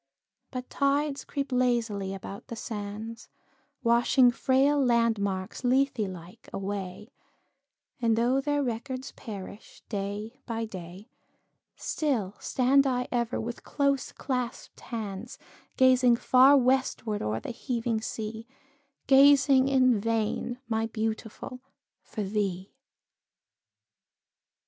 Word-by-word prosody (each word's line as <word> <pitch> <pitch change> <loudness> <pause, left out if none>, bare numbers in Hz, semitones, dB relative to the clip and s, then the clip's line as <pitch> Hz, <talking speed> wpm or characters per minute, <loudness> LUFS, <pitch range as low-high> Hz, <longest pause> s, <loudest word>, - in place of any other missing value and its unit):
But 255 -1 -6
tides 280 0 0
creep 280 -1 -4
lazily 235 -6 +1
about 195 +1 -9
the 230 - -6
sands, 220 +1 -6 0.5
Washing 240 +2 +5
frail 270 +3 +3
landmarks, 220 -5 0
Lethe 260 +1 +2
like, 185 +1 -6
away, 195 +2 -5 0.9
And 230 -2 +3
though 245 +4 +2
their 290 0 0
records 255 +2 -4
perish 205 -1 -10
day 205 +3 -4
by 230 -1 -2
day, 185 +1 -10 0.6
Still 245 - -1
stand 275 +2 +3
I 250 -1 -1
ever, 240 -1 0
with 235 +1 -5
close 280 -2 0
claspèd 250 -3 -4
hands, 220 -1 -6 0.4
Gazing 255 -2 +5
far 260 +4 +6
westward 255 -4 +1
o'er 110 +1 -1
the - - -6
heaving 235 -2 -2
sea, 220 +1 -5 0.6
Gazing 275 -1 +6
in 255 -4 +4
vain, 225 +2 -1
my 225 0 0
Beautiful, 220 +2 -4 0.4
for 215 - -5
thee. 195 -2 -2
235 Hz, 105 wpm, -28 LUFS, 210-260 Hz, 0.9 s, far